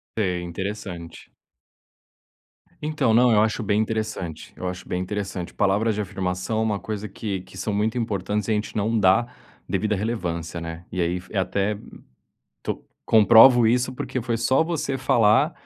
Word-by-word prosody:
É, 90 -5 0
interessante. 90 -1 -6 1.5
Então. 150 -6 +1
Não, 120 +2 +5
eu 105 -2 +5
acho 110 0 0
bem 105 0 +1
interessante, 110 -7 -4
eu 90 - -5
acho 90 +1 -6
bem 90 - -2
interessante, 95 -2 -4
palavras 105 +2 +1
de 105 - -1
afirmação 95 +2 -2
é - - +2
uma 105 -2 0
coisa 105 0 -5
que 100 -1 -4
que 95 - -14
são 105 +2 -2
muito 110 +3 0
importante, 105 -2 -2
e - - 0
a - - +4
gente 105 +1 -3
não 110 +2 +1
dá 95 0 +5
a 120 - -8 0.4
devida 110 -1 0
relevância, 90 -6 -3
né? 80 +1 -7
E 90 - -2
aí 85 +1 0
f 90 - -16
é 100 - -2
até 100 +2 0 0.9
to - - -3 0.2
comprovo 115 +2 +7
isso, 125 +3 +2
porque 130 0 -4
foi 115 -1 -1
só 130 +6 +3
você 160 -5 -2
falar 130 +3 +3
105 Hz, 170 wpm, -24 LUFS, 95-115 Hz, 1.5 s, comprovo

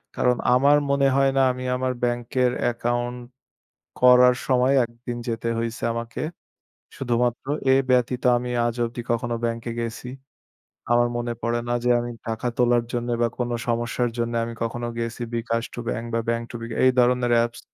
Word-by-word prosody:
কারণ, 125 0 +2 0.2
আমার 140 +3 +5
মনে 140 0 +3
হয় 135 0 +4
না - - +5
আমি 125 0 -6
আমার 130 0 -1
ব্যাংকের 120 +1 +1 0.2
account 120 +1 -2 0.8
করার 125 0 +7
সময় 130 +1 +3
একদিন 120 +1 -7
যেতে 115 0 -2
হইছে 115 +1 -4
আমাকে। 115 0 -5 0.8
শুধুমাত্র 120 0 -1 0.3
এ - - +6 0.2
ব্যতীত 125 0 +2
আমি 125 +1 -3 0.2
আজ 120 - -1
অব্দি 120 +1 -5
কখনো 120 0 0
ব্যাংকে 115 0 -2
গেসি। 115 +2 -5 0.8
আমার 120 0 +4
মনে 120 0 -2
পড়ে 120 +1 0
না 120 - 0
যে, 125 - +1
আমি 120 0 -4 0.2
টাকা 115 +2 -2
তোলার 120 -1 +3
জন্য 120 0 -2
বা 120 - +4
কোন 120 -1 -1 0.2
সমস্যার 120 +1 0
জন্য 120 0 -1
আমি 115 - -5
কখনো 120 +1 -3
গেসি। 115 +1 -3
বিকাশ 115 0 -1
to - - -6
ব্যাংক 115 0 -3
বা 115 - +1
ব্যাংক 115 0 0
to - - -9
বিকাশ, 115 0 -5
এই 130 - +6
ধরনের 125 0 +3
apps 120 0 -5
120 Hz, 170 wpm, -24 LUFS, 115-125 Hz, 0.8 s, করার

